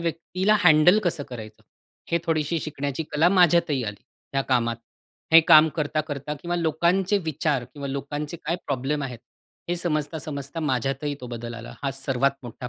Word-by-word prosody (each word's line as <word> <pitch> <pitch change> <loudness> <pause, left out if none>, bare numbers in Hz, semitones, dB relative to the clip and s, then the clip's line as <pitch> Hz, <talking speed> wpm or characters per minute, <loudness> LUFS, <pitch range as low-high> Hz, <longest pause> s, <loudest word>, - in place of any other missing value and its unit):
व्यक्तीला 180 +5 0
हँडल 170 +5 +6
कसं 170 -4 0
करायचं? 110 -3 -9 0.5
हे 170 - +2
थोडीशी 160 0 0
शिकण्याची 145 0 -3
कला 160 +4 +4
माझ्यातही 170 -6 +4
आली, 105 -1 -6 0.3
ह्या 135 - +2
कामात. 115 -2 +1 0.6
हे 165 - +10
काम 160 -1 +8
करता-करता 150 -1 -2
किंवा 175 0 -2
लोकांचे 175 +5 +1
विचार 150 -4 -1
किंवा 140 +3 -8
लोकांचे 145 +3 -4
काय 170 +3 0
प्रॉब्लेम 140 +2 -1
आहेत 125 -4 -5 0.5
हे 175 - 0
समजता, 160 -2 -1
समजता 140 +2 -6
माझ्यातही 135 +1 -1
तो 125 - -7
बदल 120 -1 -6
आला. - - -9
हा 135 - 0
सर्वात 135 0 0
मोठा 125 +1 -8
150 Hz, 155 wpm, -24 LUFS, 135-165 Hz, 0.6 s, हे